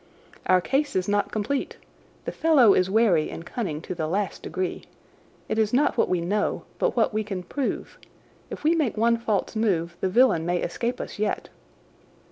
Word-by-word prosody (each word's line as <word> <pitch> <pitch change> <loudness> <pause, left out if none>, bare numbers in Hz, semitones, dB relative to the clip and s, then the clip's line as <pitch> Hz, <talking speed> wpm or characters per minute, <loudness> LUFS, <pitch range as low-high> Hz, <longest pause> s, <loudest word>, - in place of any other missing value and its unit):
"Our 185 0 +5
case 275 +8 0
is 185 -1 0
not 205 0 +1
complete. 225 +6 -2 0.5
The - - -2
fellow 280 -10 +5
is 185 0 +2
wary 195 -7 +3
and 165 - -8
cunning 175 -11 -4
to 185 - -4
the 160 -3 -3
last 195 +4 -2
degree. 185 -1 -4 0.6
It 220 - -1
is 220 0 +1
not 280 +4 +3
what - - +2
we 180 - +1
know, 205 +5 -1 0.2
but - - +1
what 225 -2 +2
we 215 0 0
can 195 -3 -5
prove. 270 +8 -4 0.5
If - - -7
we 315 +2 +4
make 300 -10 0
one 230 +1 +3
false 220 -2 -1
move 175 -6 0
the 190 - +1
villain 210 -5 +4
may 175 +1 0
escape 235 +7 -2
us - - -7
yet." 210 0 -1
210 Hz, 185 wpm, -25 LUFS, 180-235 Hz, 0.6 s, Our